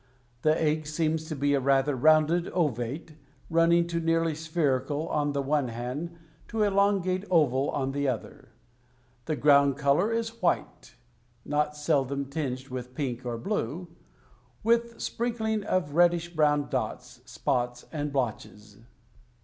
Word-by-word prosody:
The 155 Hz, 0 st, +3 dB
egg 155 Hz, -1 st, 0 dB
seems 160 Hz, 0 st, -1 dB
to 155 Hz, -1 st, -5 dB
be 145 Hz, +1 st, +1 dB
a 140 Hz, -, +3 dB
rather 135 Hz, +1 st, +2 dB
rounded 155 Hz, +5 st, +4 dB
ovate, 145 Hz, -1 st, -2 dB, 0.4 s
running 170 Hz, +1 st, +4 dB
to 170 Hz, 0 st, -2 dB
nearly 165 Hz, 0 st, +1 dB
spherical 150 Hz, -2 st, -1 dB
on 145 Hz, -1 st, 0 dB
the 140 Hz, -1 st, -1 dB
one 140 Hz, -1 st, +1 dB
hand 125 Hz, +9 st, -5 dB, 0.3 s
to 225 Hz, -2 st, 0 dB
elongate 195 Hz, -2 st, +2 dB
oval 145 Hz, -6 st, +3 dB
on 135 Hz, -1 st, -1 dB
the 140 Hz, 0 st, -1 dB
other. 130 Hz, +2 st, -5 dB, 0.8 s
The 155 Hz, -, -1 dB
ground 140 Hz, 0 st, +4 dB
color 150 Hz, +9 st, +2 dB
is 230 Hz, 0 st, -3 dB
white, 175 Hz, -, -1 dB, 0.5 s
not 150 Hz, 0 st, 0 dB
seldom 140 Hz, -2 st, 0 dB
tinged 135 Hz, -3 st, -3 dB
with 125 Hz, 0 st, -7 dB
pink 130 Hz, -3 st, -3 dB
or 120 Hz, -1 st, -2 dB
blue, 170 Hz, -, -3 dB, 0.7 s
with 235 Hz, +1 st, +1 dB
sprinkling 220 Hz, -3 st, -2 dB
of 180 Hz, -8 st, -1 dB
reddish 175 Hz, 0 st, +3 dB
brown 150 Hz, -2 st, +2 dB
dots, 125 Hz, 0 st, -4 dB
spots, 125 Hz, 0 st, -2 dB
and 150 Hz, -2 st, -3 dB
blotches. 105 Hz, -5 st, -4 dB
150 Hz, 135 wpm, -28 LUFS, 135-170 Hz, 0.8 s, rounded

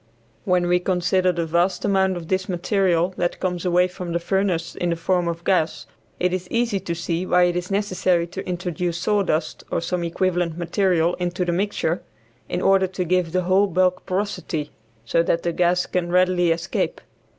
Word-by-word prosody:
When 180 Hz, -2 st, +2 dB
we 180 Hz, 0 st, +3 dB
consider 180 Hz, 0 st, +1 dB
the 170 Hz, -1 st, -2 dB
vast 170 Hz, +3 st, +1 dB
amount 190 Hz, -2 st, +2 dB
of 185 Hz, +3 st, -2 dB
material 180 Hz, -1 st, +1 dB
that 175 Hz, 0 st, -1 dB
comes 180 Hz, -1 st, -2 dB
away 180 Hz, 0 st, +3 dB
from 180 Hz, -1 st, -6 dB
the 170 Hz, -, +1 dB
furnace 180 Hz, -2 st, -1 dB
in 175 Hz, -, -1 dB
the 170 Hz, -, +1 dB
form 175 Hz, +1 st, 0 dB
of 170 Hz, 0 st, -3 dB
gas 175 Hz, -4 st, +1 dB, 0.3 s
it 180 Hz, 0 st, +1 dB
is 185 Hz, -1 st, -3 dB
easy 230 Hz, -4 st, 0 dB
to 175 Hz, -2 st, -4 dB
see 170 Hz, +1 st, -2 dB
why 180 Hz, -1 st, +3 dB
it 175 Hz, 0 st, +2 dB
is 180 Hz, 0 st, -3 dB
necessary 185 Hz, -3 st, +1 dB
to 180 Hz, +3 st, -7 dB
introduce 175 Hz, -1 st, -2 dB
sawdust 190 Hz, -3 st, 0 dB
or -, -, 0 dB
some 175 Hz, +1 st, -2 dB
equivalent 175 Hz, -1 st, -1 dB
material 175 Hz, -1 st, +1 dB
into 180 Hz, 0 st, -1 dB
the 175 Hz, -, 0 dB
mixture, 180 Hz, -2 st, -1 dB, 0.5 s
in 180 Hz, -, -2 dB
order 195 Hz, -1 st, +4 dB
to 185 Hz, 0 st, -3 dB
give 180 Hz, -1 st, +1 dB
the 185 Hz, +1 st, 0 dB
whole 190 Hz, +3 st, +3 dB
bulk 185 Hz, 0 st, +1 dB
porosity, 185 Hz, -5 st, -2 dB, 0.3 s
so 145 Hz, +8 st, +2 dB
that 170 Hz, 0 st, 0 dB
the 170 Hz, -, -1 dB
gas 180 Hz, +1 st, +2 dB
can 175 Hz, -1 st, -2 dB
readily 180 Hz, -1 st, +3 dB
escape. 170 Hz, -, -1 dB
180 Hz, 185 wpm, -22 LUFS, 170-185 Hz, 0.5 s, order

